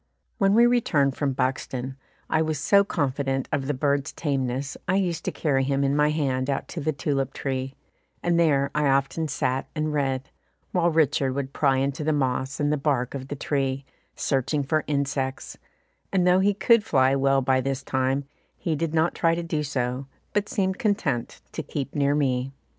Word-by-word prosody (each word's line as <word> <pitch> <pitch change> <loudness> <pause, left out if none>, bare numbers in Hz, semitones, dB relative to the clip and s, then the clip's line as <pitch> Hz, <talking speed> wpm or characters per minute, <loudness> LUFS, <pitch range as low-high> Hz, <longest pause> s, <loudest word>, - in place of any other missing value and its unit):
When 195 -1 +4
we 235 +1 +7
returned 155 - +2
from 140 -2 0
Buxton, 130 0 -2 0.3
I 160 - +2
was 155 -1 0
so 200 +8 +4
confident 135 -6 -1
of 135 -2 -1
the 150 - +1
bird's 140 +2 0
tameness 135 -2 -2
I 190 - +2
used 175 -4 0
to - - 0
carry 135 -4 +1
him 140 +1 +1
in 140 +1 +2
my 150 0 +3
hand 135 -4 0
out 135 - -1
to 170 - -5
the 155 +2 +1
tulip 140 -2 -1
tree, 135 -1 -3 0.5
and 170 -1 +2
there 140 -4 +3
I 150 -1 +2
often 135 +4 +1
sat 135 -2 -1
and 155 0 -1
read, 135 -1 -1 0.4
while 175 -1 +2
Richard 145 -5 +2
would 140 -1 -3
pry 135 -3 +2
into 140 +2 -1
the 155 +1 +1
moss 130 -1 -1
and 145 0 +2
the - - +1
bark 135 -4 0
of 135 -1 -5
the 145 - -4
tree, 135 -1 -1 0.3
searching 140 +1 0
for 155 +3 0
insects, 140 -2 -2 0.6
and 185 -2 +2
though 180 +1 +5
he 200 +1 +3
could 215 +2 +4
fly 130 -4 +3
well 135 0 +2
by 130 0 +2
this 135 +1 -2
time, 130 +1 0 0.3
he 160 - -1
did 165 +1 -2
not 160 +2 +2
try 165 -1 +2
to 170 - -3
do 160 -2 -1
so, 130 -2 -2 0.3
but 205 0 0
seemed 190 -1 0
content 180 - -1
to - - -4
keep 140 -1 -5
near 140 0 +2
me. 130 -2 0
140 Hz, 190 wpm, -25 LUFS, 135-160 Hz, 0.6 s, we